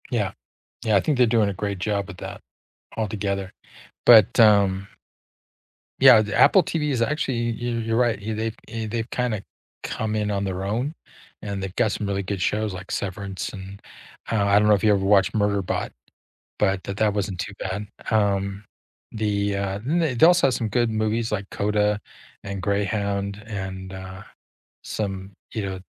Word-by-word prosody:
Yeah. 105 -6 0 0.5
Yeah, 110 -2 +3
I - - +5
think 150 -4 0
they're 125 - +6
doing 110 -3 +2
a - - -5
great 100 +1 -3
job 100 +1 -1
with 100 - -9
that - - -7 0.6
altogether, 100 -3 -2 0.5
but, 110 -1 +7
um 100 -3 +5 1.1
Yeah, 110 - +8
the 105 -2 -3
Apple 190 - +7
TV 150 -3 -1
is 125 -4 0
actually 120 -3 0
yo 120 +1 -3
you're 115 0 -1
right, 120 -3 +2
yeah, 110 +2 -4
they've 110 +1 -3
eh, 110 0 -4
they've 115 +1 -3
kinda 120 -5 -1 0.4
come 110 -1 -2
in 105 -1 0
on 100 -1 -1
their 95 -1 -3
own, 120 +9 -1 0.5
and 100 -2 -4
they've 95 -1 -5
got 110 -3 +2
some 105 - -3
really 100 0 -1
good 95 0 -4
shows 105 +1 0
like 95 0 -8
Severance, 100 0 -4
and, 95 0 -9 0.5
uh, 105 -3 +2
I 100 0 +5
don't 105 - +3
know 105 - +6
if 100 - -4
you 105 -1 +5
ever 95 -1 0
watched 100 -1 +4
Murderbot, 100 -3 0 0.7
but 95 -2 +1
that 100 - -5
that 110 -1 +3
wasn't 95 -3 -2
too 105 - -4
bad, 100 +2 -4 0.2
um, 100 -1 0 0.5
the, 100 -2 0
uh 100 0 -2
the 160 0 +1
they 120 +7 +6
also 175 -5 +5
have 130 - 0
some 115 - -2
good 120 +2 +1
movies 110 +1 0
like 100 -2 -2
CODA 105 0 +1 0.5
and 100 -1 -5
Greyhound 100 0 -1
and, 95 -3 -6
uh, 95 0 -8 0.6
some, 95 -2 -4 0.2
you 110 - -2
know 95 -1 -5
105 Hz, 180 wpm, -24 LUFS, 100-110 Hz, 1.1 s, Yeah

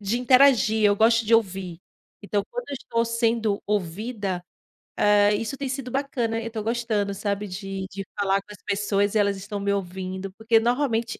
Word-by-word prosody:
de 210 +4 -1
interagir, 250 -4 +5
eu 205 0 +5
gosto 230 +1 +4
de 225 - -1
ouvir. 190 -5 0 0.4
Então, 205 0 -1
quando - - -4
eu 280 - -4
estou 230 -2 -1
sendo 230 -2 0
ouvida, 200 -1 -3 0.6
hã, 205 0 +5
isso 225 +5 -3
tem 280 - -3
sido 260 -1 -4
bacana, 245 -4 -1
eu 230 - -5
tô 220 -2 -5
gostando, 220 -3 -1
sabe, 200 +1 -2
de 195 0 -5
de 195 0 -6
falar 195 -1 +1
com 205 - -16
as 205 - -13
pessoas 205 0 0
e 215 - +4
elas 200 -1 +2
estão 200 +1 -6
me 200 0 0
ouvindo, 190 0 -4
porque 225 +1 +3
normalmente 235 -2 0
210 Hz, 180 wpm, -24 LUFS, 200-230 Hz, 0.6 s, interagir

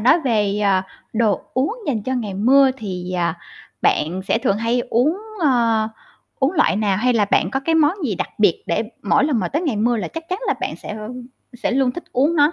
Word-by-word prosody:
nói 310 +10 +5
về, 210 -6 +1
à, 190 -2 +2 0.3
đồ 220 -3 +1
uống 275 - +1
dành 225 -8 -1
cho 260 +3 -2
ngày 210 -6 -3
mưa 265 +6 +5
thì, 185 -5 -5
à, 170 -1 -1 0.4
bạn 175 +5 +1
sẽ 225 - +3
thường 200 -3 +1
hay 230 +2 +1
uống, 275 +10 +2 0.2
ờ, 230 -6 +2 0.5
uống 275 +5 +2
loại 315 - +2
nào, 205 -3 +1
hay 250 +4 +2
là 215 -3 +3
bạn 195 - +1
có 270 +4 -1
cái 325 +4 0
món 310 0 +4
gì 220 - 0
đặc 180 - -3
biệt 205 -5 +3
để 170 - 0 0.2
mỗi 240 +7 +3
lần 285 -6 +1
mà - - -1
tới 305 +5 -1
ngày 275 -11 -1
mưa 235 +3 +2
là 215 - -3
chắc 325 0 -8
chắn 370 +2 -2
là - - +2
bạn - - -3
sẽ 215 - -7 0.6
sẽ 245 - -2
luôn 260 0 +2
thích 345 - -7
uống 290 +7 +2
nó? 295 +2 +4
235 Hz, 225 wpm, -20 LUFS, 205-275 Hz, 0.6 s, nói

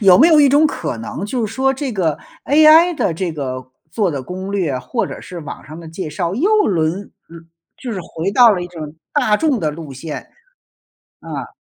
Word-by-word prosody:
有 190 -4 +7
没 315 - +7
有 315 -3 +6
一 285 - +6
种 290 +3 +5
可 155 - -4
能 115 - -5
就 235 +1 -1
是 210 - -8
说 265 +1 +2
这 270 -2 -4
个 170 -8 0 0.3
AI 315 +4 +6
的 190 - 0
这 175 +2 -3
个 130 -4 -5 0.2
做 200 0 0
的 140 -4 -4
攻 185 +6 -6
略， 175 -10 -1
或 125 0 -2
者 - - -8
是 180 - -9
网 150 - -8
上 155 +4 -10
的 170 - -10
介 165 +1 -6
绍， 170 +3 -2
又 330 - +1 0.2
轮 160 -5 +1
轮 195 +3 -9 0.3
嗯， - - -25 0.3
就 250 -3 -6
是 195 - -4
回 170 +2 -4
到 240 +2 +7
了 180 -3 -2
一 - - -5
种 160 -3 -9 0.2
大 250 -8 +2
众 285 -3 +1
的 155 - 0
路 150 -2 -8
线。 150 +4 -7 0.9
啊。 - - -6
185 Hz, 235 characters per minute, -18 LUFS, 160-255 Hz, 0.9 s, 有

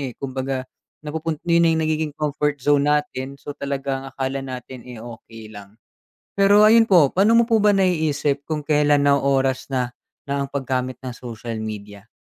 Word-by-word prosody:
eh, 130 -4 -5
kumbaga 130 -1 -4 0.4
napupun 160 +1 -3
na 170 - 0
yung 165 -1 +3
nagiging 155 -1 -1
comfort 150 -1 -1
zone 145 0 +3
natin 140 -2 -1
so 145 - -8
talaga 140 -1 -4
ang - - -11
akala 135 0 -2
natin 130 -1 -8
eh, 120 -3 -9
okey 115 -2 -11
lang. 100 0 -12 0.6
Pero 200 +1 +5
ayun 230 +1 +6
po, 175 -9 +5
pa'no 200 +4 +4
mo 230 0 +4
po 225 - +4
ba 210 - +6
naiisip 155 -7 0
kung 155 0 -3
kelan 145 -1 +2
na 140 - +5
oras 135 -1 0
na, 125 -2 0 0.4
na 140 0 -1
ang 140 - -10
pag-gamit 130 -2 -3
ng 125 -2 -7
social 115 -1 -7
media? 105 -1 -8
140 Hz, 175 wpm, -22 LUFS, 130-155 Hz, 0.6 s, ayun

